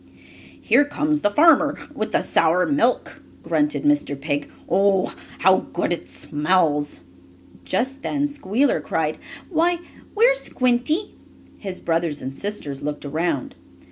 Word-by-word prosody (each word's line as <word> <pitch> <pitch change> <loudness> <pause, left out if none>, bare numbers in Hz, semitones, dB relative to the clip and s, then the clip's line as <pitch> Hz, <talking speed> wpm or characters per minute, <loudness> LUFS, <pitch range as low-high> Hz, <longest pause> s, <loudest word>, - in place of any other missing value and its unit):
"Here 290 - +4
comes 300 +1 -1
the 205 - +3
farmer 300 +4 +4 0.2
with 215 -6 -3
the - - +2
sour 165 +3 +2
milk," 295 +1 +1 0.2
grunted 300 0 0
Mr. 290 - +1
Pig. 145 0 -2 0.2
"Oh, 195 +1 +2 0.2
how - - +3
good - - 0
it 90 - -7
smells!" 150 - 0 0.6
Just 270 +3 -1
then 290 0 0
Squealer 275 -2 0
cried: 155 -1 -2 0.3
"Why, 345 +1 +2 0.4
where's - - +4
Squinty?" 255 - 0 0.5
His 190 -3 -6
brothers 165 -3 -1
and 130 +1 -6
sisters 150 -9 -5
looked 150 0 -4
around. 155 -1 -2
200 Hz, 125 wpm, -22 LUFS, -, 0.6 s, Here